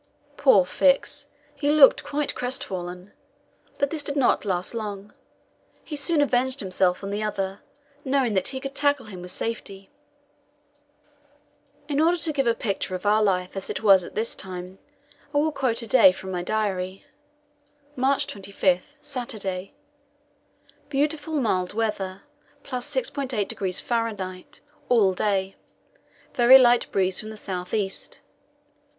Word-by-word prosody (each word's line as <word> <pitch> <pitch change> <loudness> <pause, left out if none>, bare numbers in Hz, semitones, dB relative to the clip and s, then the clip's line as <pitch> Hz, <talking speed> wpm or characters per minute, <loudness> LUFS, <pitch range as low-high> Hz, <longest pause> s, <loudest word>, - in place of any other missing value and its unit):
Poor - - +5
Fix! - - +1 0.3
he 290 - -1
looked 295 -3 +6
quite 290 0 -2
crestfallen. 185 -7 -4 0.6
But 280 -1 0
this 315 - -1
did 285 0 -3
not 270 -5 +2
last 185 0 -2
long; 210 -3 -6 0.7
he 305 - -6
soon 290 +1 +2
avenged 260 0 +1
himself 185 -1 0
on 195 - -4
the 205 +1 -2
other, 195 -2 -3 0.4
knowing 265 -4 +1
that 190 -2 +1
he 265 - -3
could 275 +1 -6
tackle 285 -3 +1
him 190 -4 -9
with 180 - -8
safety. 195 -1 -5 2.0
In 290 0 0
order 340 +2 +3
to 310 -1 -1
give 275 -3 0
a 230 - +3
picture 195 -4 -3
of 185 - -7
our 210 +1 +4
life 185 -3 0
as 195 - -5
it - - -4
was 195 -3 +6
at - - -11
this 225 +2 0
time, 185 0 -8 0.6
I - - +4
will 310 +2 +2
quote 255 -5 -1
a - - -8
day 220 -5 +7
from 190 0 -8
my 180 -1 -2
diary. 190 -2 -2 0.9
March 265 +1 +1
25 195 +4 -1
Saturday: 225 -10 -5 1.1
"Beautiful 295 +2 -1
mild 190 -6 -1
weather, 200 -4 -2 0.4
+6.8° 250 - 0
F. 205 -6 -3 0.3
all 210 -6 +4
day. 195 0 -1 0.8
Very 245 +2 +8
light 245 -2 +4
breeze 190 -1 +2
from 215 - -6
the 220 - -9
south 185 -3 -5
east. 195 -3 -3
215 Hz, 140 wpm, -25 LUFS, 190-270 Hz, 2.0 s, Very